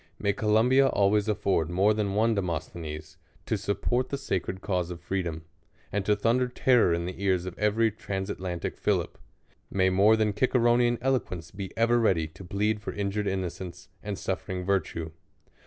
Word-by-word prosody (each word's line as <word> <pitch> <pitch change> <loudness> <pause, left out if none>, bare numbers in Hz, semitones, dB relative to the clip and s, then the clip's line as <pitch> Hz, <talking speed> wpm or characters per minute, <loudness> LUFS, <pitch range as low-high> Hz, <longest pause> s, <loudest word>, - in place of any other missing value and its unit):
May 100 - 0
Columbia 115 +6 +4
always 105 -2 +2
afford 100 -6 +1
more 95 +5 +3
than 105 -2 -1
one 115 +2 +3
De 100 - +1
mosthenes, 80 -3 -5 0.3
to - - 0
support 120 +6 -1
the 140 - -2
sacred 95 -8 -3
cause 90 -3 -1
of 85 -1 -6
freedom, 85 -2 -3 0.5
and 100 0 -1
to 105 - +4
thunder 120 +5 +2
terror 125 -5 +3
in 85 0 0
the 90 +2 -6
ears 95 -2 +1
of 95 - -6
every 110 +2 +2
transat 95 -2 -4
lantic 90 -2 -4
Philip. - - 0 0.5
May 95 -1 +2
more 100 +4 +5
than 110 -2 +1
Ciceronean 120 0 +3
eloquence 105 -11 -1
be 95 -1 -6
ever 120 +1 +3
ready 95 -8 +2
to 85 - -12
plead 105 +4 -1
for - - -4
injured 100 +1 -2
innocence, 95 -1 -4
and 105 -2 -4
suifering 95 -1 -3
virtue. 85 -4 -1
100 Hz, 170 wpm, -27 LUFS, 90-110 Hz, 0.5 s, more